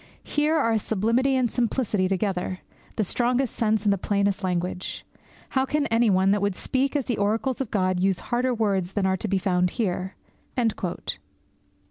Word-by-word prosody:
Here 300 +2 +1
are 230 -7 +2
sublimity 230 +7 +1
and 250 -3 +1
simplicity 225 -5 0
together, 185 -1 -1 0.3
the 220 - +1
strongest 245 +5 0
sense 220 -2 +1
and 205 -2 +3
the 200 - -2
plainest 200 0 0
language! 180 0 -2 0.4
How 265 - +1
can 295 +2 0
any 230 0 +4
one 190 0 +4
that 205 0 +2
would 200 -2 0
speak 270 +6 -1
as 280 -4 +1
the 240 - -1
oracles 225 +6 0
of 260 - -3
God 185 -3 +1
use 190 0 +2
harder 250 +2 +2
words 195 -6 0
than 200 -2 0
are 190 0 +2
to 215 - -3
be 195 -1 +1
found 180 -2 +1
here?' 190 -4 -1
210 Hz, 170 wpm, -25 LUFS, 190-245 Hz, 0.4 s, any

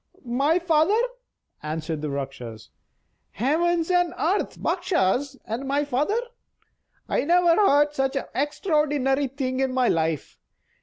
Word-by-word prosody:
"My 275 +7 +2
father?" 350 +4 +3 0.6
answered 155 0 -4
the 150 - -3
Rakshas. 125 -6 -6 0.6
"Heavens 330 - +1
and 355 -1 +2
earth! 375 +6 -1
Bakshas, 265 - 0
and 235 +5 -4
my 285 +2 +1
father! 290 - 0 0.9
I - - 0
never 345 +2 +4
heard 295 -7 +4
such 270 -1 -1
an 275 - -1
extraordinary 290 -2 +1
thing 260 -1 -3
in 265 -1 +1
my 255 -1 +2
life. 160 -3 -1
275 Hz, 120 wpm, -24 LUFS, 235-325 Hz, 0.9 s, never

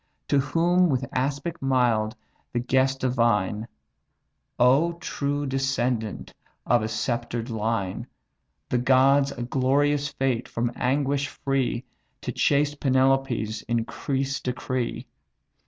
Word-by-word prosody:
To 140 - +4
whom, 170 +5 +2
with 130 -2 0
aspect 140 +6 -2
mild, 120 -4 +2 0.4
the 120 - +1
guest 130 +2 +1
divine: 115 -4 +1 0.9
"Oh 135 +8 +4
true 145 -3 -3
descendant 130 -4 -1 0.3
of 120 -2 +3
a 110 - -1
sceptred 120 +1 -2
line! 110 -4 -2 0.6
The 125 - +1
gods 135 +2 +4
a 120 - -5
glorious 140 +3 +1
fate 130 -4 -1
from 120 +1 -2
anguish 140 +2 0
free 135 -4 -1 0.4
To - - -3
chaste 145 0 +1
Penelope's 130 -5 +1
increase 135 +4 -1
decree. 125 -1 -3
130 Hz, 105 wpm, -25 LUFS, 120-140 Hz, 0.9 s, To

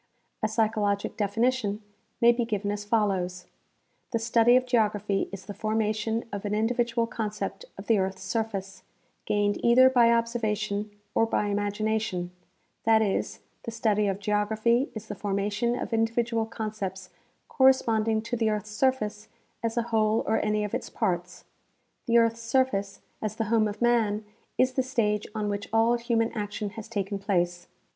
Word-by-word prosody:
A 215 - +2
psychologic 215 -2 0
definition 215 0 0 0.4
may 235 0 +7
be 240 0 0
given 205 -3 -2
as 205 0 -4
follows: 190 -4 0 0.6
The 230 - 0
study 230 +1 +4
of 255 0 +3
geography 210 -5 +1
is 195 -1 -8
the 205 - -6
formation 220 +2 -1
of 200 - -4
an 210 0 -1
individual 235 +1 +1
concept 220 - -4
of - - -8
the 225 -3 +3
earth's 190 0 -2
surface, 195 -1 -3 0.4
gained 205 0 0
either 255 +2 +6
by 240 -2 +5
observation 215 -3 -1 0.2
or 225 - +3
by 210 -2 0
imagination; 205 -2 -1 0.5
that 220 -1 +4
is, 200 -2 -2 0.2
the - - -6
study 215 -2 +1
of 195 -1 0
geography 215 +5 +1
is 220 0 -6
the - - -4
formation 205 +4 -1
of - - -4
individual 225 0 +1
concepts 210 -4 -5 0.4
cor 265 -2 +4
responding 225 -4 +2
to 235 +1 -3
the 225 -2 +1
earth's 215 0 -3
surface 215 -3 0 0.3
as 230 0 -2
a 235 - +2
whole 215 0 +3
or 220 - +1
any 210 0 +1
of 210 - -4
its - - -3
parts. 180 -4 -2 0.6
The 235 0 +4
earth's 230 0 +3
surface, 230 -5 0 0.2
as 215 -2 -3
the 225 - -1
home 220 -2 +4
of 210 +2 -4
man, 220 -3 +2 0.3
is 255 0 +3
the 260 - +1
stage 225 -5 0
on 210 -1 -1
which 205 0 -3
all 225 +2 +4
human 235 -1 0
action 210 -2 -4
has 220 0 -8
taken 200 -2 -3
place. 175 -3 -1
215 Hz, 160 wpm, -27 LUFS, 205-230 Hz, 0.6 s, may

